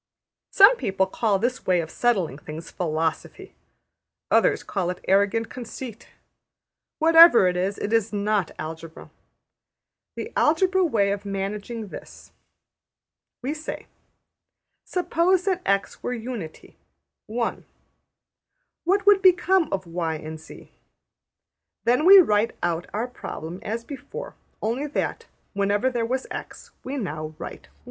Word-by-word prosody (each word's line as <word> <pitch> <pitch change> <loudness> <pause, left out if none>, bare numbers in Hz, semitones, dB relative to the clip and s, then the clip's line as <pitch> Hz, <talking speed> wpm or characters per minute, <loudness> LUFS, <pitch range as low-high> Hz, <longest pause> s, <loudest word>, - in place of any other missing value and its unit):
Some 405 +5 +7
people 190 - 0
call 200 +1 0
this 245 +5 -2
way 180 -1 +3
of 160 -1 -4
settling 190 - 0
things 155 +2 -9
Philosophy; 160 -2 -3 0.8
others - - +3
call 185 -4 -2
it 180 - -6
arrogant 200 +4 +2
conceit. 240 -2 -8 0.9
Whatever 330 - +8
it 180 - 0
is, 190 +3 -1
it 210 - -3
is 225 -1 +2
not 205 -3 0
Algebra. 160 +1 -8 1.0
The 450 - -6
Algebra 375 +5 +3
way 210 - +2
of 200 0 -3
managing 200 +3 -4
is 205 - -10
this: - - -11 1.1
We 275 +4 -1
say: 310 0 -7 1.0
Suppose 360 +1 +1
that 375 -2 0
$x$ 200 0 0
were 250 - -3
Unity 225 -9 -8 0.5
(1); 230 +2 -3 1.2
what 395 +3 +2
would 405 -1 +6
become 370 -2 +4
of 190 -1 -2
$y$ 165 -1 -3
and 155 0 -7
$z$? 160 - -14 1.1
Then 250 +6 +2
we 395 +2 +10
write 225 - +4
out 175 0 -1
our 220 +4 -2
problem 175 -8 -7
as 225 +2 -4
before; 290 - -8 0.3
only 240 +7 -1
that, 295 - -3 0.3
wherever 205 +5 +1
there 235 -2 -1
was 260 +2 -2
$x$, - - -8
we 270 +2 -4
now 155 - -5
write - - -9
1. - - -30
220 Hz, 130 wpm, -24 LUFS, 185-290 Hz, 1.2 s, we